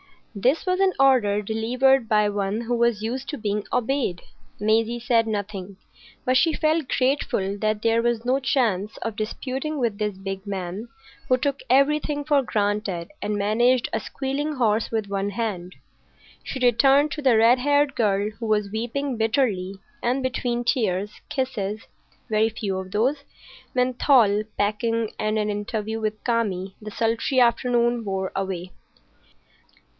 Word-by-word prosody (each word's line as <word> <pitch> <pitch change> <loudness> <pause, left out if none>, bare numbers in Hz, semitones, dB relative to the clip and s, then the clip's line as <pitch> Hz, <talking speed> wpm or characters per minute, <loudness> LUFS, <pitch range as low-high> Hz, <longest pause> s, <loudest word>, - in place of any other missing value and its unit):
This 255 - +1
was 365 0 +1
an 385 -1 +3
order 250 -7 +4
delivered 245 +4 +2
by 210 -2 +3
one 205 +1 -2
who 240 +1 -1
was 235 -2 +1
used 255 +4 -3
to 295 - -3
being 210 -2 -2
obeyed. 250 -8 0 0.4
Maisie 225 +3 +1
said 230 -1 +2
nothing, 200 -2 -4 0.5
but 255 0 +3
she 325 +3 +3
felt 310 -2 +1
grateful 255 -7 0
that 215 0 0
there 230 +1 +2
was 235 -1 0
no 260 +2 +2
chance 220 -7 0
of 225 -2 -4
disputing 265 +7 -3
with 230 -6 -1
this 210 -2 -2
big 195 +1 -6
man 195 +2 -4 0.4
who 255 - +4
took 280 +1 -1
everything 290 +2 +2
for 285 -1 +3
granted 205 -6 -2
and 210 - -1
managed 235 +5 +2
a - - +1
squealing 285 +3 -3
horse 225 -3 +1
with 220 -3 -2
one 200 0 -2
hand. 190 -5 -4 0.7
She 265 - -5
returned 275 +5 +4
to 300 - -4
the 260 -5 +4
red 235 +3 +5
haired 285 +1 +2
girl, 205 -2 +1
who 230 - -4
was 210 -2 +1
weeping 240 +4 -2
bitterly, 220 -5 0 0.3
and 255 +3 0
between 245 -2 -1
tears, 210 -5 0 0.2
kisses,—very 220 -3 -3
few 205 -3 -3
of 185 0 -8
those,—menthol, 250 -2 +1
packing, 220 +2 0
and 215 0 0
an 210 0 0
interview 215 +1 -3
with 215 -1 -3
Kami, 195 -6 -1
the 215 - -7
sultry 230 +4 0
afternoon 240 0 +2
wore 190 -2 -2
away. 185 -2 -3
225 Hz, 145 wpm, -24 LUFS, 205-255 Hz, 0.7 s, red